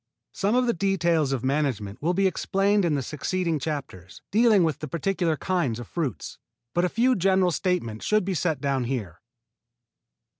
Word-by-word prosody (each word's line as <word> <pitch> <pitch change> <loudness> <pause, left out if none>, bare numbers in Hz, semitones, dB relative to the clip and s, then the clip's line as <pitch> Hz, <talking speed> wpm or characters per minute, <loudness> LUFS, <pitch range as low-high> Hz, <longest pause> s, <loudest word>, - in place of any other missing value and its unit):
Some 205 +3 0
of 250 0 +3
the 235 - +2
details 170 -6 +1
of 130 -3 -2
management 130 -6 -1
will 175 +4 +1
be 195 +1 +2
explained 195 +1 +1
in 160 -3 +1
the 140 - -1
succeeding 165 +4 -2
chapters, 135 - -6
dealing 215 -2 +5
with 160 -4 0
the 155 - -5
particular 170 +1 -1
kinds 170 -12 -1
of 120 - -8
fruits, 150 - -4 0.3
but 175 - +1
a 180 - +2
few 250 +6 +2
general 190 -1 +3
statements 160 - -2
should 215 -3 +2
be 195 - -1
set 160 -4 0
down 135 -2 -1
here. 110 -9 -4
165 Hz, 175 wpm, -25 LUFS, 135-190 Hz, 0.3 s, dealing